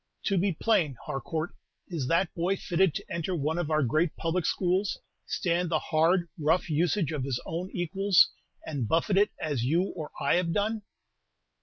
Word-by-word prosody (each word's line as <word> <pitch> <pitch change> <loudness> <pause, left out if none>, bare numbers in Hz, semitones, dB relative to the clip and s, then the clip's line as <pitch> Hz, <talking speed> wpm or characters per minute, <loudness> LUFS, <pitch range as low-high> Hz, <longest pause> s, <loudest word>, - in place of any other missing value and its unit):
To 195 - +1
be 190 +1 +1
plain, 160 - +1
Harcourt, 155 +3 -3 0.3
is 160 -8 -3
that 170 +3 +1
boy 175 +3 0
fitted 180 -3 +1
to - - -4
enter 170 +2 -2
one 160 +2 -1
of 165 -3 -2
our 155 -2 +2
great 155 +6 +1
public 165 +1 -1
schools, 185 +2 +1 0.3
stand 175 0 0
the 160 - +2
hard, 170 +3 +2
rough 160 +3 +1
usage 165 +2 +1
of 150 -4 -2
his 130 -2 -1
own 175 +3 -4
equals, 190 +2 +3 0.3
and 140 -7 -2
buffet 165 - +2
it 205 +2 +5
as 145 -6 -1
you 170 +9 +2
or 155 -4 -5
I 140 - +3
have 170 -2 0
done?" 215 +1 0
170 Hz, 175 wpm, -28 LUFS, 155-185 Hz, 0.3 s, it